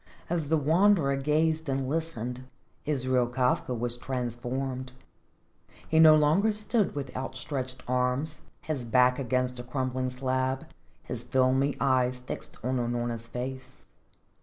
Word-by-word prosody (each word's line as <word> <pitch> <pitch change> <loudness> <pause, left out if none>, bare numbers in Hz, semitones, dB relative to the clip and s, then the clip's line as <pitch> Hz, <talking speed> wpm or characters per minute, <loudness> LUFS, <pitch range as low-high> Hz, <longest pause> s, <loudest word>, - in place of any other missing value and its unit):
As 165 -4 -1
the 160 - +4
Wanderer 160 -1 +3
gazed 155 +2 +1
and 135 -1 -1
listened, 130 -5 -3 0.4
Israel 130 -4 +1
Kafka 125 0 0
was 120 +1 -2
transformed. 130 +1 -3 1.0
He 160 - +3
no 155 -1 +9
longer 155 +9 +4
stood 210 -2 0
with 135 -3 -5
outstretched 130 0 -4
arms, 125 +5 0 0.2
his 150 -5 -3
back 125 +2 +3
against 125 -1 0
a - - -5
crumbling 130 0 -2
slab, 130 +1 -1 0.4
his - - -4
filmy 130 +2 +2
eyes 130 -2 +2
fixed 125 - -6
on 130 +1 0
Unorna's 120 -1 -2
face. 130 +2 -7
130 Hz, 125 wpm, -28 LUFS, 125-150 Hz, 1.0 s, no